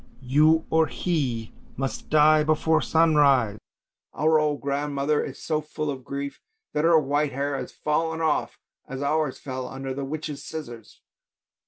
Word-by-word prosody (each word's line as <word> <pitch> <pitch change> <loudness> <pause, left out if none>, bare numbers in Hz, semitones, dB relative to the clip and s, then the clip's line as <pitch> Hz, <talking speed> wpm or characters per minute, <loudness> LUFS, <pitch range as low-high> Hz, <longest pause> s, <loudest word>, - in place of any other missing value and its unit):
you 155 +5 +4
or 160 0 +4
he 130 -11 -2 0.2
must 135 0 -4
die 155 0 +5
before 155 +1 +2
sunrise! 140 -10 +3 0.6
Our 155 0 +3
old 150 -2 0
grandmother 140 +1 -1
is 135 - -7
so 155 -1 -2
full 155 0 -4
of 130 -2 -7
grief 140 +2 -5 0.3
that 150 - 0
her 165 0 +6
white 145 0 0
hair 140 +1 -1
has - - -5
fallen 160 +2 -1
off 160 -2 0 0.3
as 135 +1 -5
ours 150 -1 0
fell 130 -2 -5
under 135 0 -5
the 140 +1 -4
witch's 150 +1 -5
scissors. 120 -8 -9
150 Hz, 150 wpm, -25 LUFS, 135-155 Hz, 0.6 s, her